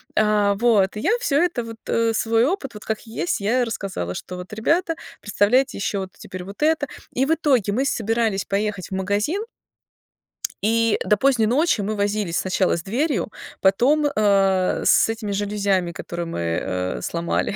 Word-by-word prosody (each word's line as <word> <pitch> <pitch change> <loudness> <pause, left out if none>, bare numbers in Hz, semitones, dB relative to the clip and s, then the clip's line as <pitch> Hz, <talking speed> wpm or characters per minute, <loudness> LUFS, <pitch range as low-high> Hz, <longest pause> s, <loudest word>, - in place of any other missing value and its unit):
А, 210 -1 +3
вот, 210 -3 +3
я 220 - 0
всё 290 - +2
это 345 -9 0
вот, 225 0 -8
э, 230 0 +1
свой 225 +2 +2
опыт, 290 - -2
вот 210 - -10
как 220 -1 -2
есть, 220 -7 -2
я 235 +6 +2
и - - +3
рассказала, 195 - -4
что 180 - -7
вот: 180 +3 -9
"Ребята, 330 +10 +1 0.2
представляете 215 +6 +2
еще, 200 0 -1
вот 190 -1 -5
теперь 185 -1 -8
вот 200 +8 -11
это". 305 -2 +2 0.2
И 260 - +1
в 320 - +2
итоге 255 - +2
мы 265 +5 +1
собирались 225 -4 0
поехать 200 -1 -2
в - - -33
магазин 205 - 0 1.2
и 230 +1 +2
до 210 - +3
поздней 245 -2 +3
ночи 270 -1 +2
мы 215 +2 -2
возились 205 -3 -1
сначала 185 -1 +1
с 170 - -6
дверью, 240 - -1 0.3
потом, 255 +11 +3
а, 195 -3 +2
с - - +5
этими 225 -2 -3
жалюзями, 200 -3 0
которые 170 0 -5
мы, 165 - -4
э, 90 +2 -2
сломали. 170 +3 -1
210 Hz, 170 wpm, -22 LUFS, 195-240 Hz, 1.2 s, с